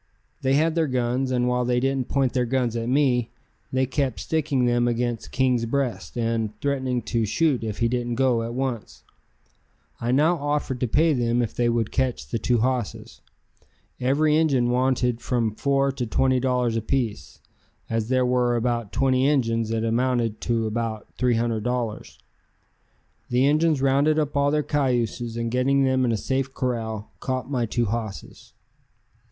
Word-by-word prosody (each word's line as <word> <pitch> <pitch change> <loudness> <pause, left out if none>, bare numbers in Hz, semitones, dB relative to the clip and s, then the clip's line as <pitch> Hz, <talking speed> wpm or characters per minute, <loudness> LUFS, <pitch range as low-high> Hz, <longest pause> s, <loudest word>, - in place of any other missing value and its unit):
They 135 +1 +2
had 160 +2 +2
their 165 -1 +1
guns, 125 0 0
and 125 -1 +1
while 125 0 +1
they 125 0 +1
didn't 135 0 0
point 135 -3 +1
their 125 -2 +1
guns 125 -2 0
at 115 0 -2
me, 125 -4 +2 0.4
they 130 0 +1
kept 130 -5 -2
sticking 145 - 0
them 120 0 +2
against 120 -1 -2
King's 125 -3 +1
breast 130 -1 -2
and 115 -2 -1
threatening 130 -4 -1
to 115 0 -1
shoot 130 +4 +1
if 110 -2 -4
he 115 - +1
didn't 120 0 -2
go 125 -2 +2
at 115 +1 -5
once. 130 -4 -4 1.0
I 120 +1 -1
now 155 +6 +3
offered 145 -3 -2
to 125 - 0
pay 155 +7 +3
them 120 -1 +1
if 115 - -4
they 120 -1 +1
would 115 -2 0
catch 130 -2 -1
the 115 - -2
two 120 -1 +1
hosses. 125 -4 -2 0.8
Every 150 +4 +2
Injun 135 -7 +2
wanted 125 -1 +1
from 115 -4 0
four 140 +3 +1
to 130 -3 -4
twenty 130 +3 +2
dollars 125 -2 0
apiece. 115 - -2 0.5
As 115 0 -2
there 130 -1 +2
were 125 -1 +2
about 120 -2 -1
twenty 130 0 +2
Injuns 115 -6 +1
it 115 0 -1
amounted 115 -1 0
to 115 -2 0
about 110 -1 -4
$300. 120 -1 -1 1.1
The 125 +2 +3
Injuns 150 -1 +2
rounded 140 +3 +3
up 150 -2 -1
all 140 0 +3
their 150 +1 +1
cayuses, 120 -5 -1
and 115 0 -2
getting 135 +2 +2
them 130 -1 +2
in 120 - +1
a 115 - 0
safe 135 +4 -2
corral, 110 -4 -3
caught 130 +1 -3
my 120 -4 0
two 120 +2 0
hosses. 110 -2 -6
125 Hz, 165 wpm, -24 LUFS, 115-135 Hz, 1.1 s, now